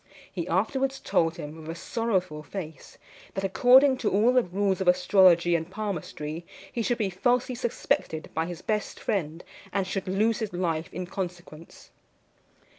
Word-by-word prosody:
He 175 -2 -3
afterwards 265 +9 0
told 165 0 +1
him 150 +1 -7
with 155 - -9
a 165 - -4
sorrowful 185 -5 -2
face, 160 +1 -8 0.4
that, 195 - -2
according 260 +7 +5
to 230 - 0
all 220 +6 +3
the 255 - +5
rules 195 0 -1
of 190 - -2
astrology 180 -1 +5
and 165 0 -2
palmistry, 175 -6 -5 0.3
he 235 - -2
should 240 +1 0
be 205 -5 -1
falsely 245 +7 +1
suspected 230 -9 -2
by 160 +1 -1
his 175 -1 -7
best 210 -1 -2
friend, 165 -5 -2 0.3
and 195 -1 0
should 190 +1 -3
lose 215 +5 +1
his 220 -5 -4
life 165 -2 -2
in 180 +2 -4
consequence. 175 -3 -8
190 Hz, 160 wpm, -27 LUFS, 170-220 Hz, 0.4 s, according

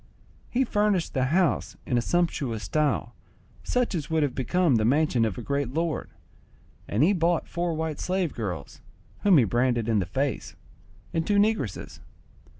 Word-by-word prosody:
He 255 +2 +2
furnished 210 -6 +1
the 130 -2 +1
house 170 +3 +1
in 125 - -1
a 120 - +3
sumptuous 140 -8 -1
style, 150 +11 0 0.5
such 250 -3 0
as 155 -5 -3
would 160 -1 +2
have 140 -3 0
become 140 +2 +2
the 110 - +1
mansion 130 -1 +2
of 105 -5 -3
a - - -5
great 140 -2 -2
lord; 165 -1 -1 0.8
and 105 +7 +1
he 190 +6 +4
bought 170 -2 +1
four 170 -1 -2
white 160 -1 -3
slave 185 -3 -1
girls, 95 -7 -5 0.4
whom 195 -5 +5
he 130 - +6
branded 120 +1 +1
in 110 -2 +2
the 90 - -2
face, 135 +8 -2 0.6
and 165 -1 -1
two 205 - +2
negresses. 215 +2 0
150 Hz, 165 wpm, -26 LUFS, 120-175 Hz, 0.8 s, he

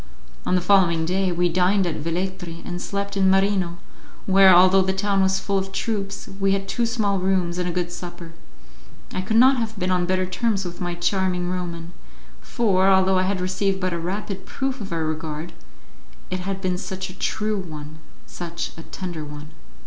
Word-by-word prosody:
On 185 - +3
the 180 - +2
following 175 -3 +4
day 185 +2 +1
we 175 0 +2
dined 185 +3 +2
at 170 - -2
Velletri 170 +1 -4
and 175 0 -5
slept 200 +1 -3
in 190 -1 +3
Marino, 190 -2 +2 0.5
where, 195 0 +7
although 185 +2 +7
the 190 0 +1
town 195 0 +1
was 190 0 +2
full 195 0 0
of 190 0 -5
troops, 200 -1 -3
we 195 0 +3
had 195 0 -2
two 235 +4 0
small 210 -4 0
rooms 180 -2 0
and 180 0 0
a - - -1
good 175 0 -2
supper. 175 -1 -8 0.8
I - - -1
could 220 +4 0
not 260 +3 +6
have 225 -2 -3
been 185 -1 -1
on 180 -1 +1
better 185 0 +1
terms 195 +1 -1
with 175 0 -7
my 175 -1 -2
charming 180 0 0
Roman; 175 -1 -5 0.5
for, 195 -5 +2
although 190 0 +4
I 185 - +1
had 200 -2 -1
received 190 +1 0
but 185 -1 -1
a 170 - -2
rapid 195 +2 -4
proof 270 -2 -3
of 200 - -6
her 165 -3 -1
regard, 155 +1 -4 0.8
it 185 - -1
had 190 +1 -4
been 180 -2 -1
such 190 -1 -5
a 185 - -16
true 215 -1 -1
one 155 -3 -8 0.3
such 170 -1 -5
a - - -7
tender 175 -2 -6
one! 150 0 -9
185 Hz, 195 wpm, -23 LUFS, 175-195 Hz, 0.8 s, where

